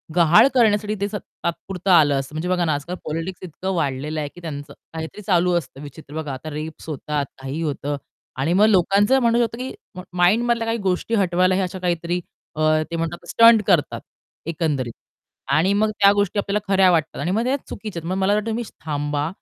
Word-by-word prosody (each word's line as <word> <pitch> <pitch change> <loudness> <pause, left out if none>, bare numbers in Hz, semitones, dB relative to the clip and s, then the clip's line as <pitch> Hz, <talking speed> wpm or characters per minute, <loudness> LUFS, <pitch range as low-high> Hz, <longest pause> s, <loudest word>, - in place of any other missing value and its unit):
गहाळ 170 +5 +6
करण्यासाठी 215 -3 +2
ते 200 - +1
तात्पुरतं 185 +1 -4
आलं 150 -5 +6
असतं. 135 +2 -7
म्हणजे 165 +3 -3
बघा 180 -1 +1
ना, 155 - +1
आजकाल 145 +5 -4
पॉलिटिक्स 165 +4 -5
इतकं 185 +2 -4
वाढलेलं 150 0 -2
आहे, 145 -1 -3
की 175 - -15
त्यांचं 145 -3 -7 0.2
काहीतरी 160 +6 -6
चालू 180 -3 +2
असतं 140 -4 -6
विचित्र. 145 0 -11
बघा, 155 -3 -4
आता 135 +4 -7
रेप्स 155 +2 -7
होतात, 150 0 -2 0.2
काही 135 +4 -4
होतं. 145 -2 -2 0.4
आणि 155 +6 0
मग 205 +3 +5
लोकांचं 205 +5 +4
म्हणणं 235 0 +3
होतं, 230 0 -1
की 255 +2 -5 0.4
माइंड 185 +7 +4
मधल्या 235 -1 +1
काही 225 +1 0
गोष्टी 185 +4 -1
हटवायला 185 -2 +2
हे 195 - +1
अशा 185 0 -4
काहीतरी 175 0 -1 0.4
अ, - - -1 0.3
ते - - -2
म्हणतात 165 +1 -4
स्टंट 230 +4 +6
करतात, - - +2 0.5
एकंदरीत. 150 -7 -1 0.6
आणि 160 +7 +3
मग 215 +2 +2
त्या 200 - +7
गोष्टी 205 0 +1
आपल्याला 200 +1 0
खऱ्या 190 -1 +5
वाटतात 160 -2 0
आणि 170 +5 -1
मग 220 +4 +1
त्या 255 +3 +1
चुकीच्या 210 -6 -6
आहेत. 165 - -6
मग 185 - -1
मला 195 +1 +2
असं - - +2
वाटतं, 210 +1 -3
तुम्ही 230 +2 -2 0.2
थांबा, 145 -1 -1
175 Hz, 200 wpm, -22 LUFS, 155-200 Hz, 0.6 s, त्या